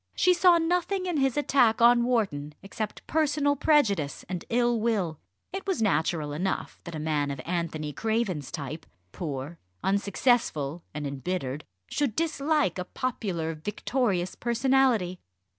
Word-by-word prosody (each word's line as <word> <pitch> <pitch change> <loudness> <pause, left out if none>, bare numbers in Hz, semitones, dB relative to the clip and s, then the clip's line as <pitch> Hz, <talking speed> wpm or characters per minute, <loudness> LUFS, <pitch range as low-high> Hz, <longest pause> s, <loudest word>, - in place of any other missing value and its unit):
She 365 - +4
saw 350 0 +6
nothing 360 +3 0
in 355 -4 -1
his 270 -2 +1
attack 255 -6 +3
on 240 0 +6
Wharton, 170 -12 0
except 210 +2 -5
personal 295 -2 +2
prejudice 215 - +2
and 180 -2 -4
ill 240 0 +2
will. 200 -9 0 0.3
It 385 +1 -5
was 385 - 0
natural 160 -6 +1
enough, 185 +6 -3
that 170 -2 -6
a - - -4
man 150 -2 0
of 140 -2 -4
Anthony 165 -3 -2
Craven's 220 - -1
type 150 +2 -6 0.2
poor, 145 - -5 0.2
unsuccessful, 195 - +1
and 150 0 -5
embittered 140 0 -3 0.2
should 275 - -1
dislike 300 - +1
a 180 - -3
popular 185 -10 -3
victorious 195 - -1
personality. 235 -6 +2
200 Hz, 135 wpm, -27 LUFS, 160-265 Hz, 0.3 s, saw